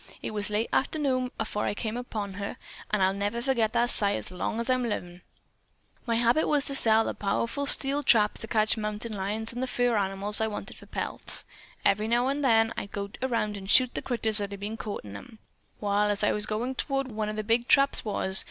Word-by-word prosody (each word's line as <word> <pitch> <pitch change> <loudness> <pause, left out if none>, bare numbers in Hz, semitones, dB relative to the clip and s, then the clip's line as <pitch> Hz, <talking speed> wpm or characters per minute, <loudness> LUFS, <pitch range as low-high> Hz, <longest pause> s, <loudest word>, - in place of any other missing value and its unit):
It - - -3
was 210 -1 -1
late 210 +2 0
arternoon 265 -3 +1
afore 210 -1 -2
I - - -1
come 220 +1 -3
upon 215 -5 -4
her, 200 +1 -5 0.3
an' 210 -2 0
I'll 190 0 +3
never 205 +3 -2
forget 235 -4 +1
that 240 0 +2
sight 200 -1 +1
as 110 - -6
long 185 +5 -3
as 235 - -2
I'm 255 0 +2
livin'. 180 -6 -4 0.9
"My 230 - +1
habit 240 +6 +3
was 290 -1 +4
to 275 - +2
set 225 -3 +4
them - - -3
powerful 230 +7 -1
steel 280 +1 +4
traps 215 -6 +3
to 225 - -5
catch 215 0 +2
mountain 215 +1 -3
lions 210 +3 -3
and 245 - -4
the 260 - -1
fur 245 -1 +1
animals 200 +1 -1
I 220 - +2
wanted 210 - -6
for - - -15
pelts. - - -1 0.4
Then, - - +6
every 210 +2 -4
few 235 +1 +3 0.2
days, 225 -4 +4
I'd 200 - -6
go 200 0 -4
the 260 - +1
round 220 -4 -1
and 195 -1 -9
shoot 255 +3 +6
the - - -3
critters 225 -3 -1
that 200 -1 -2
had 200 -1 -8
been 210 +2 -4
caught 215 -2 -5
in 100 -1 -9
'em. 160 - -11 0.4
Wall, 205 0 +1
as 205 0 -1
I 210 - +3
was 210 +1 0
goin' 230 +5 -2
toward 270 0 -2
whar 220 - -10
one 215 -1 -1
of 215 - -4
them 215 0 -4
big 235 +2 +1
traps 275 0 +5
was. 190 -3 +1
220 Hz, 235 wpm, -27 LUFS, 205-240 Hz, 0.9 s, Then